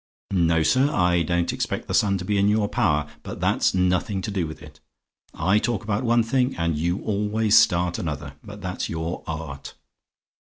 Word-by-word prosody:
No, 85 -4 +2
sir; 130 - +3
I 90 - +2
don't 85 +1 0
expect - - -3
the - - -3
sun 100 -2 +3
to 90 - -6
be 100 +1 +1
in 100 - +3
your 105 0 +2
power; 80 -11 +1
but - - -8
that's - - +1
nothing 90 +2 0
to 105 - -3
do 95 -5 -1
with 80 - -10
it. 75 -2 -14 0.6
I 100 +3 +2
talk 115 0 -2
about 105 +2 -1
one 120 -1 +3
thing, 125 +3 0
and 85 -1 0
you 85 +5 -1
always 105 +1 +1
start 90 -5 +3
another. 75 -3 -5
But 105 -1 -10
that's 90 -1 -4
your 80 +1 -4
art. 80 -4 -6
90 Hz, 190 wpm, -24 LUFS, 85-105 Hz, 0.6 s, sir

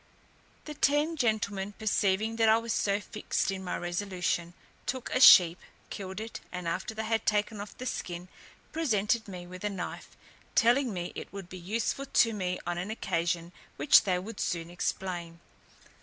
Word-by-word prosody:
The 300 - -6
ten 295 +3 +2
gentlemen 205 -6 0
perceiving 215 +1 0
that 225 -1 +4
I 220 - +6
was 230 0 -2
so 200 0 +1
fixed 210 -1 -2
in 190 -1 -5
my 180 - -2
resolution, 175 -1 -2 0.3
took 260 -1 -3
a - - +2
sheep, 180 -8 +9 0.3
killed 190 0 -5
it, 220 +1 -6
and 180 -1 -5
after 220 +6 -3
they 220 - -2
had 225 0 0
taken 210 0 +1
off 205 - -9
the 255 - -6
skin, 175 -7 -4 0.4
presented 225 -7 +1
me 180 -3 -7
with 180 +1 -10
a 210 - 0
knife, 190 -3 -6 0.4
telling 245 +2 +4
me 175 -2 -4
it - - -7
would 195 -3 -8
be 185 - -8
useful 225 +9 -2
to 230 -3 +4
me 180 -3 -2
on 175 0 -2
an 185 +4 -4
occasion 170 -5 -1 0.2
which - - +6
they 185 -4 +1
would 200 +4 -7
soon 170 0 -2
explain. 175 -1 -3
200 Hz, 170 wpm, -29 LUFS, 180-225 Hz, 0.4 s, sheep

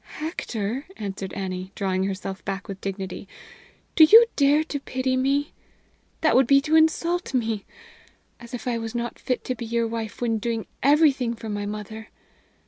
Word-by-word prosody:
"Hector," 260 - -4
answered 195 -2 -5
Annie, 185 -1 -4
drawing 190 -1 0
herself 195 0 -5
back 195 0 -4
with 195 -2 -7
dignity, 195 0 -5 0.7
"do 320 - +8
you 445 +9 +9
dare 290 +2 +4
to 295 -2 -4
pity 260 -1 -1
me? 275 +3 0 0.7
That 315 - +3
would 260 -1 +5
be 275 +1 +6
to 305 +2 +1
insult 330 0 +2
me! 225 -4 -1 0.7
As 235 -1 -12
if 245 - -7
I 235 -2 0
was 225 0 -6
not 240 0 -3
fit 250 - -2
to 255 - -2
be 235 -2 -7
your 235 0 0
wife 225 -1 -5
when 230 -2 0
doing 225 0 -2 0.2
everything 275 -4 +3
for 225 -1 -8
my 205 -1 -3
mother! 210 +1 -7
235 Hz, 170 wpm, -24 LUFS, 205-275 Hz, 0.7 s, you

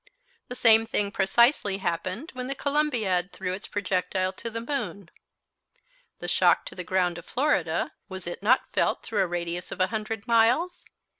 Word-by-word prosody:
The 250 - -6
same 225 -2 +5
thing 205 -2 0
precisely 205 +1 +3
happened 185 - -3
when 255 0 -5
the 275 - -3
Columbiad 235 - 0
threw 180 - -4
its 195 - -6
projectile 185 -1 -1
to 230 - -6
the 230 0 -4
moon. 230 - -4 1.1
The - - -6
shock - - +3
to - - -8
the 180 - -5
ground 180 -1 0
of - - -13
Florida, 295 +4 0 0.2
was 190 -1 -7
it 175 +2 -6
not 235 +6 +2
felt - - +1
through 215 - -1
a 190 - +2
radius 175 0 -4
of - - -5
100 215 +2 -2
miles? 240 +10 +2
205 Hz, 165 wpm, -26 LUFS, 185-235 Hz, 1.1 s, same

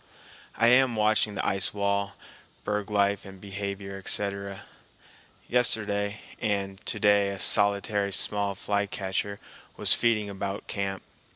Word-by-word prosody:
I - - +3
am 125 -1 +5
watching 105 -1 +2
the - - -2
ice 95 +1 0
wall, 100 0 0 0.5
berg 105 -1 -2
life 100 -1 +1
and 95 -1 -11
behavior, 100 0 -5
etc. 100 0 0 0.8
Yesterday 105 -4 0 0.2
and 100 -2 -2
to 105 - -2
day 100 -1 +4
a 100 - -4
solitary 100 0 +2
small 100 0 +1
flycatcher 100 0 -2 0.4
was - - +5
feeding 110 -3 +2
about 100 0 -5
camp. 95 -1 -3
100 Hz, 120 wpm, -27 LUFS, 100-105 Hz, 0.8 s, am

